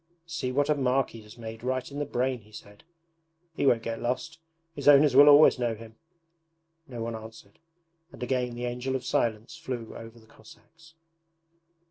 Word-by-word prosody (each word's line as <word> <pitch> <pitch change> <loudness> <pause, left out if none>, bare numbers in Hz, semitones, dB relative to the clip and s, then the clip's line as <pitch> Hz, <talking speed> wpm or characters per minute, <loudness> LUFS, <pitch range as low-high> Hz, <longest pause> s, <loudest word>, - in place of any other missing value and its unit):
'See 165 -6 -4
what 145 +2 +1
a 150 - +3
mark 135 -2 0
he 115 - -11
has 105 +1 -15
made 110 -1 -8
right 130 +2 -2
in 140 - -6
the 145 - -1
brain,' 130 -1 -1
he 105 +1 -22
said. 105 -1 -13 0.7
'He 140 - 0
won't 115 -3 +3
get 115 0 -4
lost. 145 +7 -3 0.3
His 140 -2 -6
owners 145 -1 +6
will 145 +2 +9
always 145 -2 +7
know 120 -2 -1
him!' 110 0 -13 0.9
No 120 -4 -6
one 115 0 -4
answered, 110 -2 -12 0.5
and - - -9
again 125 -1 -1
the 120 +1 -4
Angel 125 +2 -3
of 130 -1 -4
Silence 115 +5 -1
flew 130 -8 -6
over 115 +1 -10
the 110 - -18
Cossacks. 160 +10 -19
125 Hz, 180 wpm, -27 LUFS, 115-140 Hz, 0.9 s, will